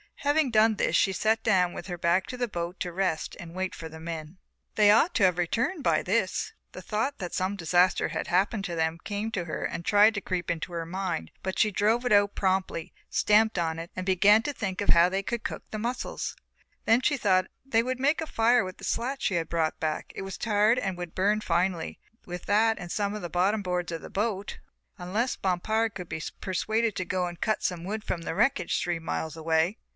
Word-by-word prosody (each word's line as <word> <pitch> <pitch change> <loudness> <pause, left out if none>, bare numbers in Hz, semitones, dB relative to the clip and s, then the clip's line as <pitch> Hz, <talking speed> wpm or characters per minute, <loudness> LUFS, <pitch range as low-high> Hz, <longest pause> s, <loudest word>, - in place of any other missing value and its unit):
Having 290 -2 +2
done 220 0 +4
this - - 0
she 195 - +3
sat 220 +3 +1
down 180 -5 +3
with - - -7
her 175 -2 -4
back 170 +3 +2
to 250 - -6
the 245 -1 0
boat 175 -2 -5
to 175 - -3
rest 175 -3 -1
and 170 0 -9
wait 185 0 -2
for 160 - -7
the 160 +1 -10
men. 160 +1 -6 0.4
They 210 -1 +5
ought 310 - +4
to 215 - +3
have 180 -2 +4
returned 245 - 0
by - - +3
this. - - 0 0.2
The - - -8
thought 230 +7 -2
that 180 -2 -5
some 185 +2 0
disaster 180 0 +2
had - - -3
happened 195 +3 +1
to 175 -4 -3
them 160 0 0
came 210 +2 -3
to 185 -6 -2
her 160 - -4
and 170 - -3
tried 205 +3 +5
to 205 - -2
creep 180 -3 -3
into 170 +1 -4
her 165 -1 -3
mind, 175 - -3
but 190 0 -3
she 215 - +3
drove 220 +5 +1
it 245 - 0
out 205 0 +5
promptly, 185 -4 -1 0.2
stamped 215 0 +3
on 165 -1 -1
it 165 +1 -7
and 185 - -4
began 200 +3 +5
to 290 - -2
think 195 -7 -3
of 200 - -2
how 170 +1 +6
they 195 +1 -1
would 235 -1 -2
cook - - -4
the 215 - -4
mussles. 240 +4 -3 0.5
They 225 -1 +2
would 255 +1 -2
make 290 +5 +2
a 320 - -4
fire 235 -2 +3
with 185 0 -7
the - - -15
slat 260 +4 -2
she 190 - +1
had 165 -1 -1
brought 165 -2 0
back, 155 -1 -2
it - - -5
was 195 -1 -6
tarred 215 +1 +3
and 190 -2 -3
would 175 -2 -7
burn 205 +3 +2
finely, 175 -4 -1 0.3
with 180 0 -7
that 220 +2 +3
and 175 -1 -7
some 205 -1 -1
of 210 - -5
the 175 - -4
bottom 195 +5 +1
boards 180 -2 -2
of 165 -1 -4
the - - -9
boat, 205 -1 -2 0.4
unless 210 +8 -1
Bompard 215 +4 0
could 180 -3 -7
be 160 - -4 0.2
persuaded 215 +3 0
to 185 -2 -2
go 180 0 -1
and 175 -1 -9
cut 215 - 0
some 175 -2 -1
wood 210 +4 -4
from 170 - -3
the - - -3
wreckage 215 -4 +1
three 175 -1 -1
miles 160 -1 -3
away. 160 +4 +1
190 Hz, 225 wpm, -27 LUFS, 175-220 Hz, 0.5 s, how